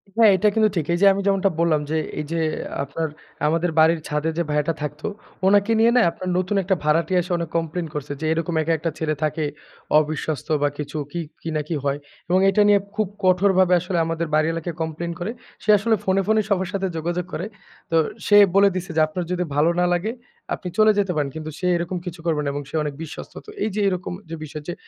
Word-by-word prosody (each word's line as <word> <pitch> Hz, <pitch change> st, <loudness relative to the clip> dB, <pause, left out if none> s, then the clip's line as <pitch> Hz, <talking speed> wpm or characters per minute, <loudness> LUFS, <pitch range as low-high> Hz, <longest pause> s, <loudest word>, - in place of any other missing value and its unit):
হ্যাঁ, 225 Hz, -2 st, +7 dB
এটা 210 Hz, -, +2 dB
কিন্তু 215 Hz, -1 st, +4 dB
ঠিক। 165 Hz, -4 st, 0 dB
এই 175 Hz, -, 0 dB
যে -, -, +6 dB
আমি 200 Hz, -, -2 dB
যেমনটা 195 Hz, 0 st, +3 dB
বললাম 165 Hz, -3 st, +3 dB
যে 160 Hz, -, +1 dB, 0.2 s
এই 150 Hz, -, -3 dB
যে 165 Hz, -, 0 dB, 0.4 s
আপনার 160 Hz, +4 st, -3 dB, 0.4 s
আমাদের 165 Hz, +2 st, +1 dB
বাড়ির 160 Hz, +1 st, +5 dB
ছাদে 150 Hz, +2 st, -1 dB
যে 170 Hz, -, +2 dB
ভাইয়াটা 150 Hz, +2 st, +1 dB
থাকতো, 150 Hz, +3 st, -4 dB, 0.4 s
উনাকে 205 Hz, +2 st, +4 dB
নিয়ে 230 Hz, +1 st, +5 dB
না? -, -, +6 dB
আপনার 185 Hz, -, -6 dB
নতুন 185 Hz, +3 st, 0 dB
একটা 190 Hz, +1 st, +1 dB
ভাড়াটিয়া 165 Hz, +4 st, +2 dB
এসে 180 Hz, +2 st, -7 dB, 0.3 s
কমপ্লেইন 165 Hz, +1 st, -2 dB
করছে 150 Hz, -1 st, -5 dB
যে 160 Hz, -, -3 dB
"এরকম 165 Hz, +1 st, -2 dB
একা 165 Hz, +1 st, +1 dB
একটা 165 Hz, +1 st, -2 dB
ছেলে 155 Hz, -1 st, 0 dB
থাকে। 155 Hz, +1 st, 0 dB, 0.6 s
অবিশ্বস্ত 155 Hz, -2 st, -3 dB
বা 145 Hz, -, +4 dB
কিছু 150 Hz, +1 st, -5 dB
কি, 175 Hz, -, -3 dB, 0.2 s
কি, 165 Hz, -, -5 dB
না 155 Hz, -, +1 dB
কি 165 Hz, -, -2 dB
হয়?" 140 Hz, 0 st, 0 dB, 0.3 s
এবং 185 Hz, +1 st, +4 dB
এটা 195 Hz, +2 st, +3 dB
নিয়ে 205 Hz, -1 st, +6 dB, 0.2 s
খুব 215 Hz, -1 st, +1 dB, 0.2 s
কঠোরভাবে 185 Hz, 0 st, +4 dB
আসলে 180 Hz, +1 st, -3 dB
আমাদের 165 Hz, 0 st, -2 dB
বাড়িওয়ালাকে 165 Hz, +2 st, 0 dB
কমপ্লেইন 160 Hz, +2 st, -3 dB
করে। 180 Hz, +5 st, -3 dB, 0.3 s
সে -, -, -6 dB
আসলে 220 Hz, +3 st, +2 dB
ফোনে, 190 Hz, +1 st, +2 dB
ফোনে, 220 Hz, 0 st, +4 dB
সবার 190 Hz, -2 st, +1 dB
সাথে 195 Hz, -1 st, 0 dB
যোগাযোগ 175 Hz, +2 st, -2 dB
করে। 175 Hz, -, -3 dB, 0.5 s
তো -, -, +2 dB, 0.3 s
সে 205 Hz, -, +5 dB, 0.2 s
বলে 200 Hz, 0 st, +6 dB
দিছে 185 Hz, -1 st, -4 dB
যে -, -, +5 dB
"আপনার 175 Hz, +3 st, -4 dB
যদি 180 Hz, 0 st, 0 dB
ভালো 150 Hz, +3 st, +4 dB
না 180 Hz, -, +3 dB
লাগে, 180 Hz, +6 st, -1 dB, 0.4 s
আপনি -, -, -5 dB
চলে 215 Hz, 0 st, +6 dB
যেতে 195 Hz, -2 st, +1 dB
পারেন। 145 Hz, -2 st, 0 dB
কিন্তু 155 Hz, 0 st, -5 dB
সে -, -, -3 dB
এরকম 175 Hz, +2 st, -3 dB
কিছু 175 Hz, -1 st, -6 dB
করবে 160 Hz, -3 st, +1 dB
না -, -, -3 dB
এবং 145 Hz, 0 st, -4 dB
সে -, -, -7 dB
অনেক 150 Hz, -1 st, -3 dB
বিশ্বস্ত।" 160 Hz, -, -9 dB
তো -, -, -12 dB
এই -, -, 0 dB
যে 210 Hz, -, 0 dB
এরকম 185 Hz, -1 st, -3 dB, 0.2 s
যে 165 Hz, -, -4 dB
বিষয় 150 Hz, 0 st, -7 dB
যে 175 Hz, -, -2 dB
170 Hz, 220 wpm, -22 LUFS, 155-190 Hz, 0.6 s, হ্যাঁ